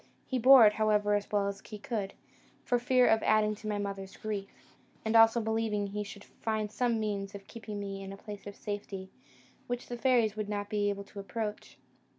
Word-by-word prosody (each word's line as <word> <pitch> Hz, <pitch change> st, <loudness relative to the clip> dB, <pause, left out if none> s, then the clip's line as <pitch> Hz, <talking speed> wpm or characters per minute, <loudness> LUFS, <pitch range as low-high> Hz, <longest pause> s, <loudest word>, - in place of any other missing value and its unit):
He 260 Hz, -, -1 dB
bore 255 Hz, -1 st, +9 dB
it, 210 Hz, -, +6 dB
however, 210 Hz, -1 st, +2 dB
as 205 Hz, 0 st, -1 dB
well 205 Hz, -1 st, +2 dB
as 200 Hz, 0 st, -4 dB
he 215 Hz, -, -8 dB
could, 205 Hz, -2 st, -4 dB, 0.5 s
for 245 Hz, -, +2 dB
fear 250 Hz, +1 st, +4 dB
of 220 Hz, -, +4 dB
adding 215 Hz, 0 st, +3 dB
to 215 Hz, +1 st, -9 dB
my 210 Hz, -1 st, -1 dB
mother's 195 Hz, -1 st, -5 dB
grief; 205 Hz, -2 st, -4 dB, 0.6 s
and 220 Hz, +1 st, 0 dB
also 225 Hz, +1 st, +7 dB
believing 220 Hz, -2 st, 0 dB
he 205 Hz, +1 st, -3 dB
should 200 Hz, 0 st, -10 dB
find 215 Hz, -2 st, -3 dB
some 235 Hz, -1 st, +1 dB
means 200 Hz, -2 st, -3 dB
of 195 Hz, -1 st, -9 dB
keeping 220 Hz, -3 st, -7 dB
me 195 Hz, -1 st, -5 dB
in 195 Hz, 0 st, -7 dB
a 195 Hz, -, -8 dB
place 205 Hz, 0 st, -9 dB
of 200 Hz, -, -7 dB
safety, 195 Hz, -2 st, -6 dB, 0.6 s
which 245 Hz, 0 st, -4 dB
the 240 Hz, -, -4 dB
fairies 235 Hz, -4 st, +3 dB
would 215 Hz, -1 st, -3 dB
not 205 Hz, 0 st, -3 dB
be 205 Hz, -1 st, +1 dB
able 200 Hz, 0 st, -3 dB
to 200 Hz, +1 st, -11 dB
approach. 210 Hz, +2 st, -5 dB
210 Hz, 205 wpm, -31 LUFS, 200-225 Hz, 0.6 s, bore